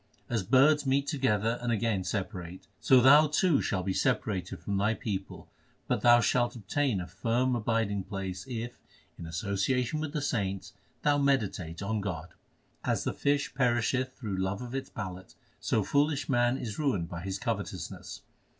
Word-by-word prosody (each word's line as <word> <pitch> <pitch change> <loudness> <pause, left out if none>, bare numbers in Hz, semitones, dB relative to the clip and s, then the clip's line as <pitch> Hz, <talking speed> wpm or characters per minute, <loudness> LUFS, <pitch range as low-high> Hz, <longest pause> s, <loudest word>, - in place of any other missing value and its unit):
As 115 -3 +1
birds 135 +9 +4
meet 135 +1 +2
together 120 - 0
and 120 -1 -1
again 110 -3 0
separate, 90 -3 -4
so 130 -2 +5
thou 145 +5 +7
too 155 +1 +2
shalt 95 -3 -1
be 95 - 0
separated 100 -7 -1
from 100 -1 -2
thy 105 +3 +2
people, 100 -4 -5 0.4
but - - 0
thou 120 0 +7
shalt 120 +1 +1
obtain 120 +1 0
a 90 - -4
firm 120 +8 0
abiding 110 -4 0
place 95 -2 -5
if 120 -1 -5 0.4
in 85 - -6
association 100 - -1
with 155 -1 -3
the 150 - 0
saints 100 -10 -2 0.3
thou 145 -1 +3
meditate 105 - 0
on 110 +1 -1
God. 90 -4 -4 0.5
As - - 0
the - - -1
fish 145 -2 0
perisheth 125 0 +1
through 105 -6 -5
love 95 +4 -2
of 125 0 -8
its 135 0 -4
palate, 95 -2 -7 0.2
so 110 - +1
foolish 145 +2 +1
man 120 0 +2
is 115 -2 -5
ruined 125 - 0
by 85 0 -6
his 95 +1 -3
covetousness. 100 -6 -5
115 Hz, 165 wpm, -29 LUFS, 95-130 Hz, 0.5 s, thou